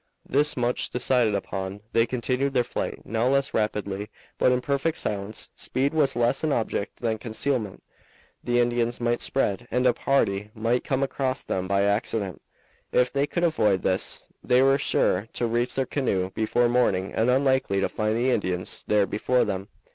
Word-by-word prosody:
This 145 Hz, +2 st, +2 dB
much 125 Hz, 0 st, 0 dB
decided 125 Hz, -3 st, +2 dB
upon, 95 Hz, 0 st, -4 dB
they 115 Hz, +1 st, +3 dB
continued 130 Hz, +2 st, -1 dB
their 125 Hz, -, +4 dB
flight, 120 Hz, -, -5 dB
now 115 Hz, +2 st, 0 dB
less 140 Hz, +1 st, +1 dB
rapidly, 105 Hz, -1 st, -2 dB, 0.3 s
but -, -, +4 dB
in 125 Hz, -, +2 dB
perfect 140 Hz, +4 st, -1 dB
silence. 100 Hz, +1 st, -4 dB
Speed 135 Hz, +3 st, -1 dB
was 145 Hz, -5 st, +2 dB
less 120 Hz, +4 st, +1 dB
an 155 Hz, -, +1 dB
object 110 Hz, -4 st, -2 dB
than 110 Hz, -2 st, -1 dB
concealment. 110 Hz, -2 st, -2 dB, 0.6 s
The 120 Hz, 0 st, +1 dB
Indians 120 Hz, 0 st, 0 dB
might 120 Hz, 0 st, 0 dB
spread, 120 Hz, -3 st, 0 dB
and 125 Hz, +2 st, 0 dB
a 125 Hz, -, +5 dB
party 105 Hz, -7 st, 0 dB
might 115 Hz, +3 st, 0 dB
come 135 Hz, 0 st, 0 dB
across 135 Hz, -1 st, -2 dB
them 95 Hz, 0 st, -2 dB
by 100 Hz, +1 st, +2 dB
accident. 100 Hz, -2 st, -1 dB, 0.5 s
If 125 Hz, 0 st, +2 dB
they 140 Hz, +1 st, +1 dB
could 175 Hz, -, -2 dB
avoid 105 Hz, -, +2 dB
this, 95 Hz, 0 st, +1 dB, 0.2 s
they 125 Hz, +1 st, +4 dB
were 135 Hz, +1 st, +4 dB
sure 100 Hz, -6 st, +1 dB
to 120 Hz, -, -1 dB
reach 120 Hz, +2 st, 0 dB
their 135 Hz, -, +1 dB
canoe 100 Hz, -9 st, -1 dB
before 120 Hz, +3 st, +1 dB
morning 110 Hz, -6 st, +1 dB
and 115 Hz, +3 st, +1 dB
unlikely 130 Hz, -6 st, +2 dB
to -, -, +2 dB
find 110 Hz, 0 st, -1 dB
the 125 Hz, +2 st, +2 dB
Indians 90 Hz, -6 st, -2 dB
there 105 Hz, -1 st, +3 dB
before 125 Hz, +5 st, +1 dB
them. 95 Hz, +1 st, -3 dB
120 Hz, 175 wpm, -25 LUFS, 105-130 Hz, 0.6 s, a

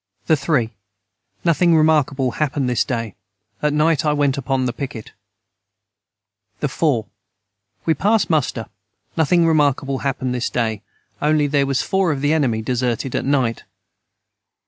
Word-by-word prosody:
the 160 Hz, -, +4 dB
3. 135 Hz, -5 st, 0 dB, 0.7 s
Nothing 170 Hz, 0 st, +4 dB
remarkable 145 Hz, -4 st, +2 dB
hapened 145 Hz, -2 st, -1 dB
this 125 Hz, -2 st, +1 dB
day 115 Hz, -5 st, -3 dB, 0.5 s
at 150 Hz, -, +1 dB
night 150 Hz, 0 st, +2 dB
I 150 Hz, -1 st, +2 dB
went 145 Hz, -2 st, +1 dB
upon 135 Hz, -1 st, -1 dB
the 120 Hz, -, -1 dB
piquet. 125 Hz, -5 st, -7 dB, 1.5 s
the -, -, 0 dB
4. 135 Hz, -10 st, 0 dB, 0.8 s
We 160 Hz, -, +3 dB
past 210 Hz, +5 st, +2 dB
muster 135 Hz, -8 st, 0 dB, 0.5 s
nothing 165 Hz, +2 st, +3 dB
remarkble 145 Hz, -4 st, +1 dB
hapened 130 Hz, -2 st, -2 dB
this 125 Hz, -1 st, -1 dB
day 110 Hz, -3 st, -1 dB, 0.4 s
onely 150 Hz, 0 st, +2 dB
their 140 Hz, -1 st, +1 dB
was 135 Hz, -1 st, 0 dB
four 190 Hz, -3 st, +1 dB
of 140 Hz, -2 st, -3 dB
the 145 Hz, +2 st, +2 dB
enemy 120 Hz, -8 st, +1 dB
deserted 125 Hz, +1 st, -1 dB
at -, -, -1 dB
night. 130 Hz, -5 st, 0 dB
140 Hz, 140 wpm, -20 LUFS, 125-155 Hz, 1.5 s, the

